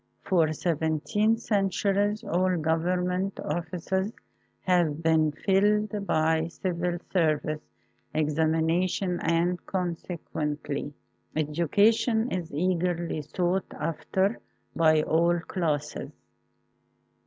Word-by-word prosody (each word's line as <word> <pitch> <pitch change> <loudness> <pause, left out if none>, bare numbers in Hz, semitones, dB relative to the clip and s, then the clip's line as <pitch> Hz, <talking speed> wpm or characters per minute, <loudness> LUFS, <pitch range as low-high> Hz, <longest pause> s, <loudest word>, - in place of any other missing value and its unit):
For 165 -4 +2
seventeen 165 +8 +1
centuries 205 0 0
all 185 -2 +1
Govern 165 +3 +1
ment 185 +2 -2
offices 175 +5 -2 0.5
have 170 -4 +1
been 160 -1 +3
filled 205 +4 +1
by 160 +1 +2
civil 175 0 -2 0.2
service 155 -3 +1 0.5
examinations 160 +4 +1
and 170 +2 +1
consequently 155 -5 -3 0.4
education 205 - +2
is 180 -3 -3
eagerly 170 0 0
sought 180 +5 -1
after 190 +6 -1 0.4
by 155 -2 +4
all 170 +2 +2
classes. 155 -5 -2
175 Hz, 85 wpm, -27 LUFS, 160-190 Hz, 0.5 s, by